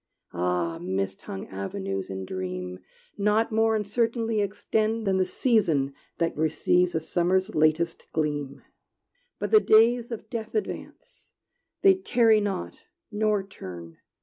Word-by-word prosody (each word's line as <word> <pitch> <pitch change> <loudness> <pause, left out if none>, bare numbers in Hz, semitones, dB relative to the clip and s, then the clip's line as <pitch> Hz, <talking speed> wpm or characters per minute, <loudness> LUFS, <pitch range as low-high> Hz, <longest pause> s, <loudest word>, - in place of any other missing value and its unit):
Ah, 90 -1 -1
mist 95 +2 -3
hung 95 - -6
avenues 95 0 -4
in 95 0 -5
dream 90 -1 -5 0.4
Not 210 +3 +2
more 225 0 +3
uncertainly 225 +1 0
extend 215 +2 -1
Than 190 -1 +2
the 185 - +2
season 165 - +1 0.2
that 165 -1 0
receives 165 +3 +2
A - - +2
summer's 185 +5 0
latest 155 +2 +1
gleam! 145 -3 -2 0.7
But - - -3
the 435 - +8
days 235 - +4
of 230 -2 -6
death 225 -1 -5
advance: 430 - -6 0.5
They 390 -1 +8
tarry 235 - +3
not, 140 - -3 0.3
nor 210 -1 +1
turn! 85 - -10
185 Hz, 125 wpm, -26 LUFS, -, 0.7 s, the